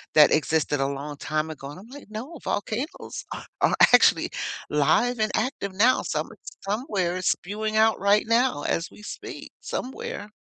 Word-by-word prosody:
that 150 -1 +8
existed 150 -2 +1
a 135 - +2
long 140 +1 -5
time 155 +2 -2
ago. 140 -3 -7
And 165 - -10
I'm 210 - -13
like, 280 -1 -12
"No, 255 +10 -7
volcanoes 230 - -3
are - - -6 0.2
are - - +4 0.2
actually - - +5 0.4
live 155 - +2
and 215 0 +1
active 220 -4 -1
now. 235 +7 +4
Some - - -2 0.3
somewhere 195 - -1
it's 185 - +2
spewing 215 +3 -3
out 220 0 +4
right 200 +1 +4
now 230 - +2
as 165 - -1
we - - -15
speak, 210 - -8
somewhere." 215 -5 -5
205 Hz, 165 wpm, -25 LUFS, 155-230 Hz, 0.4 s, that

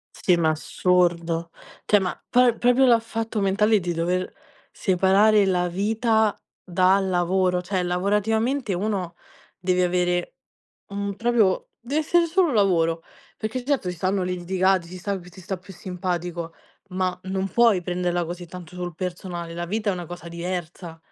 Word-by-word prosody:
Sì 180 - +2
ma 160 -2 +2
assurdo. 170 +1 +1 0.4
Cioè, 205 - +4
ma 185 -2 -2
poi, 245 -1 +4
proprio 245 +2 +4
dal 235 -2 +5
fatto 225 -1 -3
mentale 205 +2 +3
di 175 -1 -2
dover 180 +2 -1 0.4
separare 195 +3 +3
la 180 -2 +1
vita 220 +3 +1 0.3
dal 185 +2 +2
lavoro. 180 0 +1
Cioè 185 0 -1
lavorativamente 210 +6 0
uno 185 -3 -2 0.4
deve 180 0 +1
avere 180 0 0 0.5
un 200 0 -3
proprio 225 -3 +1
deve 275 +6 -1
essere 340 +2 +3
solo 345 -2 +2
lavoro, 165 -5 +2 0.3
perché 230 +3 -4
certo 270 -11 0
ci 180 - -7
stanno 190 +2 0
litigati, 180 0 0
ci 185 - -9
sta 195 +2 -3
chi 175 - -14
ti 185 +1 -14
sta 190 +1 -4
più 185 +2 -13
simpatico, 175 -2 -4 0.3
ma 185 -1 -1
non 190 0 -2
puoi 225 -6 +4
prenderla 175 0 -1
così 175 +1 -7
tanto 180 0 -10
sul 180 -1 -5
personale, 175 -1 -5
la 175 +1 -4
vita 210 +3 -1
è - - 0
una 175 -2 -5
cosa 175 0 -8
diversa. 170 -1 -5
185 Hz, 155 wpm, -24 LUFS, 175-205 Hz, 0.5 s, dal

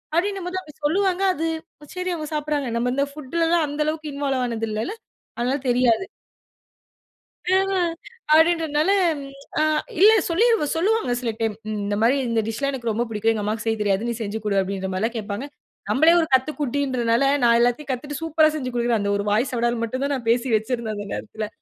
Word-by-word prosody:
அப்டின்னும்போது 370 0 -1
அப்டி 300 - -14
சொல்லுவாங்க. 380 +4 +1
அது 330 -1 -2 0.5
சரி 365 0 -2
அவுங்க 310 -3 -4
சாப்ட்றாங்க 295 -3 -1
நம்ம 245 +1 0
இந்த 280 +1 +2
ஃபுட்லலாம், 325 +3 0
அந்த 290 +1 -3
அளவுக்கு 310 -1 -3
இன்வால்வ் 275 -2 -1
ஆனது 225 -1 -3
இல்லல்ல, 215 - -2 0.5
அதனால 255 +4 0
தெரியாது. 245 +7 +2 1.4
ம் 385 +1 +3
அ, - - +2 0.5
அப்டின்றனால 320 0 +3 0.7
அ - - +4 0.4
இல்ல 410 +4 +8 0.2
சொல்லிரு 440 +1 +3
சொல்லுவாங்க 410 - +1
சில 235 -2 -1
டைம். 225 -2 -1 0.2
இந்த 205 0 -2
மாரி 245 +5 +4
"இந்த 230 -1 +1
டிஷ் 225 -1 -3
எல்லாம் 280 0 0
எனக்கு 235 -4 -2
ரொம்ப 230 +3 -1
பிடிக்கும். 225 +1 +1
எங்க 215 -2 -3
அம்மாக்கு 215 +2 -2
செய்ய 225 0 0
தெரியாது. 205 +2 +1
நீ - - -1
செஞ்சு 215 0 -3
குடு" 200 -2 +1
அப்டின்ற 190 0 -3
மாரில்லாம் 225 +6 -1
கேப்பாங்க. 210 +4 -4 0.4
நம்பளே 315 +5 +5
ஒரு 325 - +1
கத்துக்குட்டின்றனால, 260 -3 +1 0.2
"நான் 235 -1 +5
எல்லாத்தையும் 245 +4 +1
கத்துட்டு 280 +3 -4
சூப்பரா 315 -1 +4
செஞ்சு 255 -4 -3
குடுக்றேன்." 235 -1 +1
அந்த 200 0 0
ஒரு 200 - -3
வாய் 230 +6 +2
சவுடால் 235 -1 0
மட்டும் 255 +4 -2
தான் 285 - 0
நான் 245 -4 -6
பேசி 235 +2 +2
வச்சிருந்தேன் 220 0 -2
அந்த 205 0 -6
நேரத்துல. 215 0 -5
255 Hz, 180 wpm, -23 LUFS, 225-310 Hz, 1.4 s, இல்ல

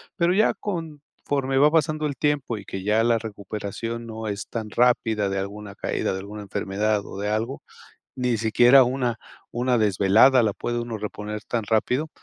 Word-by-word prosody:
Pero 175 -1 +2
ya 215 +3 +3
conforme 150 -6 -4
va 145 +2 +6
pasando 155 -1 +1
el 140 - -4
tiempo 145 -6 -1
y 100 - -9
que 95 0 -6
ya 105 +3 +2
la 115 -1 +3
recuperación 110 +2 -6
no 110 -1 -6
es 100 -1 -5
tan 110 -2 -5
rápida, 110 -2 +2
de 95 0 -1
alguna 100 +1 -6
caída, - - -2
de 95 - -4
alguna 105 +2 -8
enfermedad 100 +1 -1
o - - -9
de 105 - -2
algo, 115 +6 -2 0.5
ni 125 -2 0
siquiera 120 +4 +6
una 125 -2 -1 0.3
una 125 0 +1
desvelada 110 +5 +5
la 105 -2 +1
puede 120 +3 -3
uno 120 -2 -5
reponer 105 0 -5
tan 115 -3 -2
rápido. 125 +8 0
115 Hz, 175 wpm, -24 LUFS, 105-130 Hz, 0.5 s, va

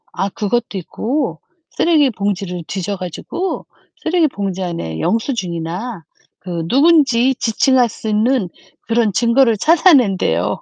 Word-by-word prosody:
아 195 - -1
그것도 215 +1 -2
있고 225 - -3 0.3
쓰레기 310 -5 +3
봉지를 195 -5 -3
뒤져 195 +1 -3
가지고 185 - -5 0.4
쓰레기 330 -1 +2
봉지 195 -7 -4
안에 125 - -4
영수증이나 190 - -3 0.4
그 170 -3 -5
누군지 270 - +4
지칭할 250 +2 +2
수 220 - -6
있는 215 -1 +1 0.3
그런 230 -3 0
증거를 235 +1 +3
찾아낸대요. 245 - +3
220 Hz, 275 characters per minute, -17 LUFS, 185-265 Hz, 0.4 s, 누군지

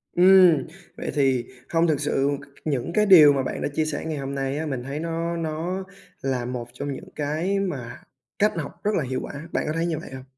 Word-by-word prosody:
Ừm, 180 -3 +6 0.3
vậy - - -4
thì 135 -4 +2 0.2
hông 165 0 +3
thực 150 -3 +1
sự 140 -1 +1
c - - -12
c - - -23 0.2
những 140 +3 -1
cái 210 0 +3
điều 155 -7 +9
mà 135 -1 0
bạn - - -4
đã - - 0
chia 155 0 +1
sẻ 155 0 -3
ngày 155 -2 -3
hôm 140 0 -4
nay 135 +1 -2
á, 160 - -2
mình 130 -4 -3
thấy 140 +3 -4
nó 165 +1 -2
nó 165 +4 -3 0.4
là 130 -3 -1
một 120 -1 -4
trong 140 +2 -4
những - - -9
cái 160 +7 -1
mà 140 -8 -4 0.4
cách 210 +1 +4
học 150 - -3
rất 210 - +2
là 160 - +1
hiệu 130 0 -2
quả, - - -7 0.2
bạn - - 0
có 155 - -1
thấy 165 +1 0
như 165 -3 -1
vậy - - -10
hông? 130 -1 -8
150 Hz, 245 wpm, -24 LUFS, 135-170 Hz, 0.4 s, điều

